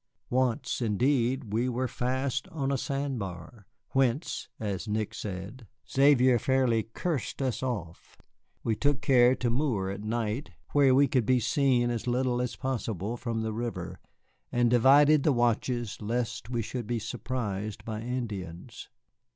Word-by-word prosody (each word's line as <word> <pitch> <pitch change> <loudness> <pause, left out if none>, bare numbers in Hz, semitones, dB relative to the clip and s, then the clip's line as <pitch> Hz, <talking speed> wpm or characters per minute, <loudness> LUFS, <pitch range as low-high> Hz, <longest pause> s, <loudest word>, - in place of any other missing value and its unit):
Once, 125 +1 0
indeed, 120 +1 +1
we 120 +3 +1
were 125 +1 -1
fast 130 +2 -2
on 140 -4 -2
a - - +2
sand 140 -2 -2
bar, 95 +2 -8 0.2
whence 135 +2 0
(as 100 -5 -3
Nick 105 0 -1
said) 100 +5 -6 0.2
Xavier 130 -3 +5
fairly 130 -2 +2
cursed 130 - -3
us 130 -3 -1
off. 100 -11 -5 0.5
We 115 - +1
took 140 +5 +1
care 130 -3 +5
to 120 -2 -1
moor 115 -8 0
at 100 - -6
night, 115 +3 -2 0.2
where 140 -3 +5
we 140 +1 +5
could 125 -6 +1
be 130 -1 +4
seen 120 0 +2
as 120 0 -3
little 125 0 +1
as 125 -2 -2
possible 115 -5 -3
from 115 -2 -3
the 110 -1 -2
river, 120 +1 -4 0.5
and 120 -1 +2
divided 140 +5 +6
the 150 - +3
watches 120 -1 0
lest 115 +1 -2
we 120 -2 -1
should 120 0 -5
be 120 - -1
surprised 110 -3 -4
by 110 -1 -4
Indians. 105 -9 -5
120 Hz, 150 wpm, -29 LUFS, 110-130 Hz, 0.5 s, divided